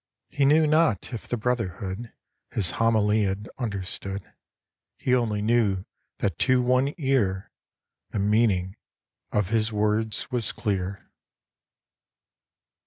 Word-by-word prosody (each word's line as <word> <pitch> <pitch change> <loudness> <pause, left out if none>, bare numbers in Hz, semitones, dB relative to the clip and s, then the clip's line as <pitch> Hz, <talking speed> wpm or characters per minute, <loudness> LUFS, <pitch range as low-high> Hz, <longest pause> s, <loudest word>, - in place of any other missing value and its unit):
He 140 - +2
knew 155 +3 +5
not 155 - +2
if 115 - -6
the 120 - -1
brotherhood 110 -2 -3 0.4
His 100 -6 +1
homily 110 -2 +2
had 100 +1 -1
understood; 100 -3 -4 0.6
He 125 - 0
only 110 -4 +1
knew 105 -5 +2 0.3
that 100 - -2
to 130 -1 +4
one 130 +3 +2
ear 120 - 0 0.6
The - - -4
meaning 100 -2 +2 0.5
of 105 -3 0
his 110 0 +1
words 105 +3 0
was 120 -4 0
clear. 100 -2 -3
110 Hz, 110 wpm, -26 LUFS, 100-125 Hz, 0.6 s, knew